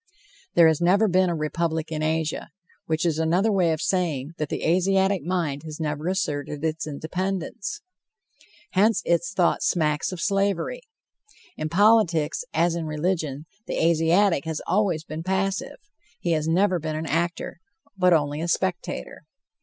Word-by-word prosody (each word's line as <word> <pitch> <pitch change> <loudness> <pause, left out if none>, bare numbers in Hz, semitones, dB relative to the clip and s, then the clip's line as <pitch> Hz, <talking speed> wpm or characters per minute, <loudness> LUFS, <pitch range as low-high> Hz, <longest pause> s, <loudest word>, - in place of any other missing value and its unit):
There 170 -1 +7
has 160 0 +2
never 195 +5 +4
been 185 -1 +3
a 170 - -1
republic 160 +1 -2
in 155 -1 -2
Asia, 160 0 -1 0.4
which 160 +1 0
is 160 -2 +1
another 175 +7 +2
way 180 -4 +3
of 155 - -2
saying 160 -7 -1
that 150 -1 -2
the - - -3
Asiatic 190 +2 +2
mind 165 -4 -2
has 155 -1 -8
never 150 0 -3
asserted 150 -5 -2
its 160 0 -2
independence. 185 - -4 0.9
Hence 210 +4 +3
its 170 +1 +1
thought 180 -3 +2
smacks 150 -2 +1
of 185 - -6
slavery. 195 - 0 0.7
In 155 - -3
politics, 180 - +3
as 170 0 +2
in 170 -1 -3
religion, 155 -2 -2 0.2
the - - -3
Asiatic 165 +1 +3
has 160 -2 -3
always 180 -4 +1
been 155 0 -6
passive. 190 +2 -1 0.4
He 175 - -1
has 155 -1 0
never 180 +2 +2
been 155 0 -3
an 155 +1 -3
actor, 170 +3 -2 0.4
but 180 -2 +3
only 150 -2 +2
a 170 - -2
spectator. 175 -2 -2
170 Hz, 155 wpm, -24 LUFS, 155-185 Hz, 0.9 s, There